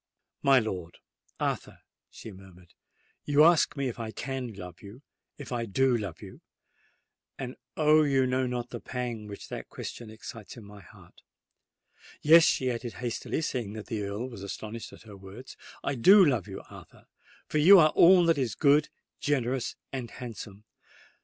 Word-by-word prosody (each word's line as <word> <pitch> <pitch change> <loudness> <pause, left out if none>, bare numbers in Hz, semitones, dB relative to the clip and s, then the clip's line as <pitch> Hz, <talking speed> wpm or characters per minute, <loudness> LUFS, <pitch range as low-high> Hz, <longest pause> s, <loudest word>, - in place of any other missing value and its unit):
"My 135 -1 +5
lord—Arthur," 90 -8 -5 0.3
she 110 - -11
murmured, 95 -2 -16 0.5
"you 145 +1 +4
ask 165 -2 +4
me 140 -1 -1
if 120 -1 -6
I 115 -1 -4
can 130 +1 -5
love—if 100 - -13
I 120 -2 -2
do 130 +5 +2
love 100 -7 -5
you:—and, 125 -1 -14 0.2
oh! 155 0 +5
you 135 -3 +2
know 130 0 0
not 125 -1 -4
the - - -5
pang 120 -4 -5
which 100 -1 -9
that - - -7
question 120 -2 -8
excites 110 +1 -10
in 115 - -11
my 100 0 -13
heart! - - -18 1.0
Yes," 165 +2 +8
she 130 -1 +1
added 120 0 -5
hastily, 125 +5 -4
seeing 120 -8 -3
that 110 -1 -8
the 110 -3 -4
Earl 100 +5 -4
was 115 -6 -10
astonished 110 +3 -7
at - - -15
her 105 -3 -12
words, 100 +7 -12 0.3
"I 140 - -1
do 190 - +7
love 125 - 0
you, - - -8
Arthur—for 155 - -9
you 190 +7 +8
are 155 -3 +6
all 175 +2 +6
that 165 -3 +2
is 125 -6 -1
good, 150 +1 +3 0.3
generous, 130 -3 -1 0.2
and 125 -3 -4
handsome! 105 -4 -9
125 Hz, 155 wpm, -28 LUFS, 105-140 Hz, 1.0 s, Yes